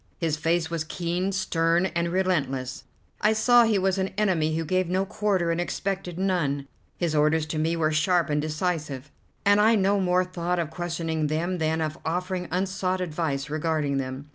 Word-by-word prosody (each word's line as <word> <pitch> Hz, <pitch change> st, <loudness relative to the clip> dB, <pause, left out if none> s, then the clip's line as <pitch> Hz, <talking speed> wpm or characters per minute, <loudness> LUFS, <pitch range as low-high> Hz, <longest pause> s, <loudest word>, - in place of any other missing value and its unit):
His 165 Hz, -3 st, 0 dB
face 165 Hz, +1 st, 0 dB
was 165 Hz, -2 st, -1 dB
keen, 175 Hz, +4 st, -2 dB
stern, 170 Hz, -2 st, +1 dB
and 170 Hz, -1 st, -1 dB
relentless; 140 Hz, -8 st, -1 dB, 0.4 s
I 215 Hz, +1 st, +4 dB
saw 240 Hz, +2 st, +5 dB
he 220 Hz, -2 st, +2 dB
was 190 Hz, 0 st, +1 dB
an 190 Hz, -, +1 dB
enemy 170 Hz, -7 st, +1 dB
who 165 Hz, -, -2 dB
gave 185 Hz, +2 st, 0 dB
no 190 Hz, +2 st, +1 dB
quarter 195 Hz, -4 st, 0 dB
and 165 Hz, +1 st, 0 dB
expected 185 Hz, -1 st, -3 dB
none. 160 Hz, -8 st, 0 dB, 0.3 s
His 170 Hz, -3 st, -1 dB
orders 150 Hz, +1 st, +3 dB
to 155 Hz, 0 st, -3 dB
me 165 Hz, +2 st, +1 dB
were 160 Hz, -2 st, +1 dB
sharp 165 Hz, +3 st, +2 dB
and 150 Hz, 0 st, +1 dB
decisive, 155 Hz, -3 st, -3 dB, 0.3 s
and 205 Hz, +1 st, +5 dB
I 225 Hz, +2 st, +5 dB
no 200 Hz, 0 st, +2 dB
more 180 Hz, -1 st, +2 dB
thought 180 Hz, -1 st, -2 dB
of 165 Hz, -3 st, -2 dB
questioning 165 Hz, -2 st, -2 dB
them 170 Hz, +4 st, -1 dB
than 160 Hz, 0 st, 0 dB
of 155 Hz, +1 st, -3 dB
offering 180 Hz, +2 st, -2 dB
unsought 185 Hz, +1 st, -1 dB
advice 155 Hz, -5 st, -2 dB
regarding 155 Hz, -2 st, 0 dB
them. 135 Hz, +1 st, -4 dB
170 Hz, 180 wpm, -26 LUFS, 155-185 Hz, 0.4 s, saw